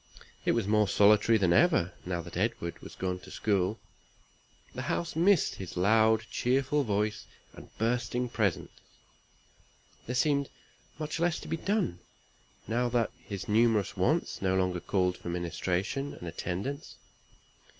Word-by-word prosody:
It - - +3
was - - 0
more 105 0 +3
solitary 105 +3 +5
than 95 -4 +3
ever, 155 - +3
now 85 -2 -1
that 85 0 -10
Edward 90 -3 -2
was - - -10
gone 90 -1 -2
to - - -13
school. 100 0 0 0.9
The - - -5
house 170 - -2
missed 175 +1 +3
his 95 -2 -8
loud 110 +3 +4
cheerful 135 +3 +1
voice, 105 -1 -1 0.3
and - - -12
bursting 120 +2 0
presence. 105 -7 -1 1.4
There 125 - -2
seemed 140 +1 +2 0.5
much 155 +1 -4
less 170 0 +1
to - - -9
be 165 - -2
done, 195 - -1 0.7
now 120 +3 +1
that 120 -2 +1
his 100 -2 -6
numerous 110 -2 +2
wants - - 0
no 95 -1 +1
longer 90 -1 +1
called 90 0 0
for - - -7
ministration 90 +9 -2
and 85 - -9
attendance. 95 - -4
110 Hz, 140 wpm, -30 LUFS, 90-125 Hz, 1.4 s, solitary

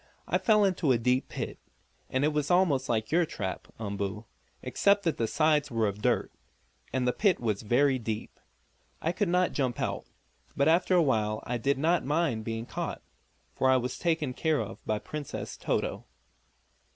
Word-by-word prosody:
"I - - +1
fell 210 -2 +4
into 180 -7 +1
a 125 - +4
deep 125 +3 +1
pit. - - -5 0.5
It 145 +4 +1
was 150 -1 0
almost 160 -8 +3
like 110 0 0
your 170 +2 +4
trap, 95 - -4
Umboo, 100 0 -4 0.4
except 200 0 +2
that 165 - 0
the 115 - 0
sides 150 +2 +2
were 115 -3 +1
of 100 +1 -4
dirt, - - +1 0.6
and 130 -1 0
the 125 - +2
pit 200 -5 +2
was 110 -4 -1
very 130 +4 +2
deep. 110 -2 -5 0.6
I 165 - 0
could 200 +1 -1
not 180 +1 +2
jump 130 -4 -1
out. - - -2 0.5
But 140 - +3
after 175 +3 +4
a 175 - +5
while 110 -6 0
I 120 0 -2
did 140 +4 +1
not 165 +4 +2
mind 145 -6 0
being 115 0 -3
caught, - - -5 0.5
for 130 - +2
I 130 - +5
was 125 0 -3
taken 160 -6 0
care 155 +2 +1
of 110 0 -6
by 110 - +1
Princess 150 +5 -6
Toto." - - -2
135 Hz, 175 wpm, -29 LUFS, 115-160 Hz, 0.6 s, a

